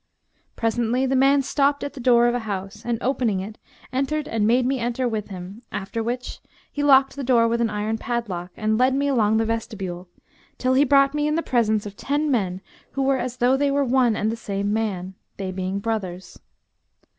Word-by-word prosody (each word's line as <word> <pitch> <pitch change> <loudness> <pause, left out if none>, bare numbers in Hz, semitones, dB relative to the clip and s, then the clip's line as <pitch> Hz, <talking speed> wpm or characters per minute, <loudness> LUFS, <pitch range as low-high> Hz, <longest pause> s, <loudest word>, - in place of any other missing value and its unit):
Presently 235 +3 0
the 265 0 +1
man 275 +1 +4
stopped 285 +1 +1
at 285 - -4
the - - -9
door 240 -1 +4
of 240 - +3
a 245 - 0
house, 205 -1 -5
and 235 -1 -1
opening 245 -6 +1
it 210 +3 -7 0.3
entered 290 +3 -1
and 215 -2 0
made 245 +2 +3
me 265 +1 0
enter 245 +2 -1
with 220 -3 -3
him; 190 +3 -9
after 205 +3 -4
which 245 +2 -4 0.3
he 290 - -3
locked 270 -2 +5
the 280 - -5
door 240 -2 +4
with 235 +1 0
an 230 - +2
iron 215 +1 -2
padlock,[FN#212] 195 -8 -4
and 215 0 +2
led 255 +1 +3
me 280 +1 +1
along 220 -5 +2
the 225 - +1
vestibule, 195 -6 -4 0.5
till 255 0 +1
he 270 +2 +5
brought 275 0 +4
me 295 0 0
in 300 - +1
the 330 - 0
presence 220 -4 +1
of 205 -1 -7
ten 290 +5 -1
men 190 -7 0 0.3
who 275 - -1
were 270 -1 +2
as 250 0 -4
though 250 +2 +3
they 285 +1 +1
were 280 0 +1
one 250 -3 +3
and 215 +1 0
the - - -3
same 200 -2 -2
man; 195 -4 -2 0.2
they 190 -1 -4
being 185 +1 -3
brothers. 200 -4 -4
235 Hz, 210 wpm, -23 LUFS, 210-265 Hz, 0.5 s, locked